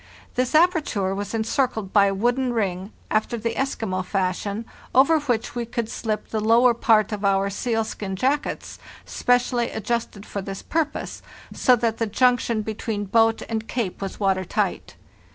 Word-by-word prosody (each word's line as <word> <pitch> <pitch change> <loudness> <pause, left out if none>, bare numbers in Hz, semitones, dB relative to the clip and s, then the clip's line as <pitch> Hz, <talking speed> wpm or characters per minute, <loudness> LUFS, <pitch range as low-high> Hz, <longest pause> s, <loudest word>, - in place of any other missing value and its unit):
This 255 +3 0
aperture 305 - +2
was 205 +2 -4
encircled 225 -3 -1
by 200 -1 +6
a 195 - 0
wooden 245 +4 +1
ring, 195 -3 -2 0.2
after 220 +2 0
the 230 +1 -2
Eskimo 220 -8 -2
fashion, 195 +3 -2 0.3
over 285 +5 +6
which 245 -6 -1
we 240 - -2
could 235 -1 -3
slip 215 -2 -3
the 220 - -1
lower 235 +3 +5
part 225 -3 +3
of 210 -1 -4
our 195 0 +2
sealskin 220 -3 -2
jackets, 275 +8 -1 0.3
specially 245 -1 +1
adjusted 220 -2 -3
for 200 - -5
this 195 0 -7
purpose, 320 -2 -2 0.3
so 255 - +4
that 230 -1 -1
the 225 - 0
junction 235 -1 +2
between 215 -1 -3
boat 225 +2 +3
and 225 -1 -3
jacket 225 -8 -3
was 195 -1 -5
water 190 -2 +1
tight. - - -2
225 Hz, 155 wpm, -23 LUFS, 200-245 Hz, 0.3 s, by